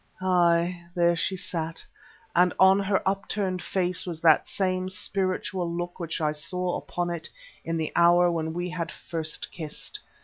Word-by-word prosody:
Ay! 175 -1 +3
there 170 -1 +4
she 190 +3 -1
sat, 165 -3 -3 0.5
and 180 +1 +4
on 190 +1 +7
her 195 -1 0
upturned 195 -1 -1
face 180 -2 -1
was 170 -3 -5
that 160 -2 +5
same 185 -1 -1
spiritual 185 -1 -2
look 175 +1 -4
which 170 -2 -3
I 155 -1 +1
saw 175 +4 -3
upon 175 0 -3
it 170 -2 -4 0.3
in 165 0 -2
the 160 -1 -2
hour 175 +1 +6
when 160 -1 -1
we 175 +1 -3 0.4
first 160 -2 -1
had - - -21
kissed. 155 -4 -6
175 Hz, 160 wpm, -27 LUFS, 170-185 Hz, 0.5 s, on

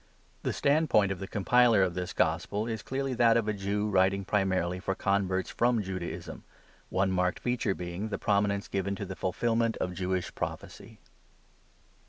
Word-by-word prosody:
The - - -1
standpoint 140 -9 +3
of 95 - -4
the 95 - -5
compiler 115 +1 +4
of 90 -2 0
this 90 +1 -4
gospel 95 +6 0
is 110 -2 -3
clearly 135 0 -2
that 115 -1 +4
of 115 -2 0
a 110 - +1
Jew 100 +1 -1
writing 95 -1 +2
primarily 95 -3 0
for 95 +1 -2
converts 95 -1 0
from 120 -2 +2
Judaism, 95 -2 -6 0.5
one 95 0 +1
marked 90 0 0
feature 120 -5 -1
being 90 +4 -4
the - - -2
prominence 100 -1 +1
given 100 0 -2
to 100 - -5
the 95 - -6
fulfilment 115 +5 0
of 90 - -2
Jewish 90 -1 -2
prophecy. - - -6
100 Hz, 165 wpm, -29 LUFS, 95-110 Hz, 0.5 s, compiler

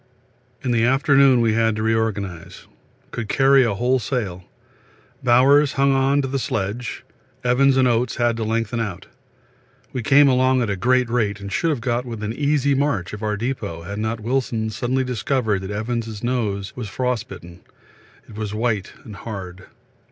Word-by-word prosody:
In 125 - -1
the 115 -1 +2
afternoon 135 0 +4
we 115 -2 +2
had 115 -1 +2
to 110 - -3
reorganise. 105 -6 -2 0.5
Could 115 -2 -5
carry 135 -1 +5
a 110 -4 0
whole 125 +5 +1
sail. 100 -7 -3 0.8
Bowers 135 +4 +5
hung 140 0 +2
on 135 +1 +2
to - - -2
the 135 +1 -2
sledge, 110 +1 -3 0.4
Evans 130 +2 +3
and 130 -1 +4
Oates 120 0 +1
had 120 -1 +1
to 115 - -2
lengthen 115 +1 -1
out. 100 -5 -4 0.9
We 130 - -2
came 140 +5 +5
along 130 -1 +3
at 110 - -1
a - - -1
great 125 +5 +2
rate 110 -4 -1
and 100 0 -7
should 165 - +1
have 145 -7 -1
got 120 +1 -1
within 110 -3 -5
an - - -8
easy 145 -1 +2
march 135 -11 -1
of 105 - -7
our 105 -1 -1
depot 110 -8 -4
had 100 +4 -6
not 110 +1 -2
Wilson 115 -2 -1
suddenly 130 +4 -1
discovered 125 -4 -1
that 95 - -6
Evans' 110 0 -4
nose 105 -6 -2
was 120 -5 -6
frostbitten 110 -7 -4 0.7
it - - -13
was 105 -1 -4
white 110 -3 -1
and 105 -3 -10
hard. 95 -4 -8
115 Hz, 175 wpm, -21 LUFS, 105-130 Hz, 0.9 s, carry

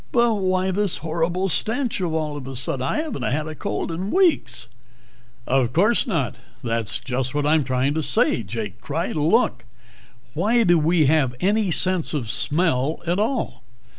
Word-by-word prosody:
"But 235 -1 +3
why 185 -2 0
this 200 -1 0
horrible 170 +4 0
stench 225 - -1
all 160 -4 -1
of 140 -3 -7
a 135 - -6
sudden? 130 +1 -2
I 300 - 0
haven't 315 - -5
had 150 +4 -1
a 155 - -5
cold 155 - -3
in 180 +4 -3
weeks 310 - +2 0.4
" 120 +1 -31
"Of 130 -2 +1
course 210 - +3
not! 160 - -1 0.3
That's 115 -2 -1
just 130 +1 -3
what 145 -1 0
I'm 155 0 +3
trying 130 +2 0
to 160 - -1
say," 135 - +1
Jake 105 -1 -6
cried. 155 +8 -3
"Look, 155 - +2 0.7
why 220 +9 +2
do 175 -4 +4
we 160 0 +3
have 135 -4 +2
any 205 +1 +1
sense 175 -1 +1
of 120 -7 -2
smell 150 -2 0
at 175 +3 0
all? 230 +6 -1
160 Hz, 170 wpm, -23 LUFS, 130-190 Hz, 0.7 s, do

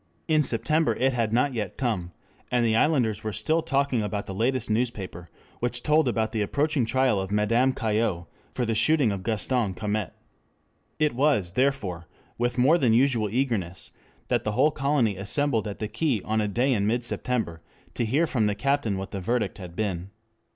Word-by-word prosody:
In 155 -2 +4
September 150 +5 +1
it 130 +1 +1
had 115 -3 0
not 125 +4 +2
yet 105 -5 -4
come, 105 -9 -2 0.4
and 120 -1 +2
the 110 -1 +2
islanders 115 -6 +2
were 110 - -2
still 130 - +1
talking 140 -5 0
about 105 -1 -3
the 95 - -6
latest 120 +4 0
newspaper 105 -7 -3 0.3
which 120 0 -2
told 155 -1 +3
about 110 -2 0
the 110 - -1
approaching 140 +5 +1
trial 130 -3 +2
of 95 +1 -5
Madame 115 +5 +2
Caillaux 110 -7 -1 0.3
for 125 - 0
the 115 - 0
shooting 140 +1 +3
of 100 -1 -4
Gaston 110 -1 -1
Calmette. 105 -1 -3 0.8
It 150 -2 +1
was, 125 -9 +2
therefore, 105 -9 -1 0.3
with 120 +1 0
more 145 +8 +4
than 120 -6 +3
usual 120 -3 +2
eagerness 105 -7 -2 0.4
that - - 0
the 105 - -2
whole 140 +7 +3
colony 140 -9 +1
assembled 115 +3 0
at 100 - -5
the 105 - -3
quay 120 +2 0
on 110 0 0
a 105 - 0
day 125 +6 +1
in 100 -3 +1
mid 120 +2 0
September 115 -9 -2 0.3
to 120 - -1
hear 135 +9 +2
from 115 -9 0
the 105 - 0
captain 135 -3 0
what 95 +1 -6
the 100 - -4
verdict 115 +2 -1
had 90 -3 -9
been. 95 -3 -3
115 Hz, 185 wpm, -26 LUFS, 105-135 Hz, 0.8 s, In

